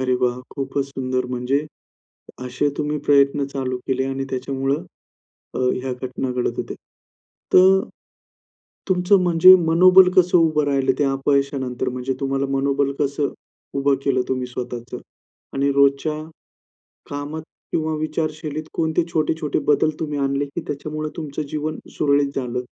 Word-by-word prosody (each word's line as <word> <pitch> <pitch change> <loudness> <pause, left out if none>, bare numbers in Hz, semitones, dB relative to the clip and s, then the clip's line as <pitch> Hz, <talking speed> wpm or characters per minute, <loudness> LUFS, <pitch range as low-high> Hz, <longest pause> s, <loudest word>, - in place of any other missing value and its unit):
अरे 130 -1 +1
वाह! 125 0 0
खूपच 135 0 -2
सुंदर 130 -2 -2
म्हणजे 130 +4 -1 0.8
असे 130 +3 0
तुम्ही 150 0 -1
प्रयत्न 140 0 +3
चालू 130 -2 -2
केले 130 0 0
आणि 135 0 -3
त्याच्यामुळं 135 +2 -2 0.7
अ, - - -3
ह्या 130 +1 0
घटना 125 +1 -4
घडत 125 -1 -1
होत्या. - - -4 0.8
तर 190 +1 +7 1.1
तुमचं 185 +2 +4
म्हणजे 175 +1 +8 0.2
मनोबल 185 +2 +7
कसं 180 0 +5
उभं 155 -2 +3
राहिलं 135 -2 +2
त्या 140 -2 +2
अपयशानंतर 135 -2 0
म्हणजे 125 +1 -3
तुम्हाला 135 0 -1
मनोबल 140 0 +1
कसं 140 0 -1 0.4
उभं 140 0 +3
केलं 130 -2 +2
तुम्ही 130 -1 -1
स्वतःचं? 125 0 -6 0.6
आणि 140 +1 +1
रोजच्या 140 +2 +2 0.9
कामात 145 +2 -5 0.3
किंवा 160 0 -1
विचारशैलीत 155 -1 -3
कोणते 160 +1 +1
छोटे-छोटे 155 -1 0
बदल 150 +1 +3
तुम्ही 150 -2 -3
आणले 140 +1 0
की 145 +4 -6
त्याच्यामुळे 155 +2 -4
तुमचं 155 -2 -4
जीवन 155 +1 -3 0.2
सुरळीत 140 -1 +2
झालं? 125 -2 -2
140 Hz, 130 wpm, -21 LUFS, 130-155 Hz, 1.1 s, म्हणजे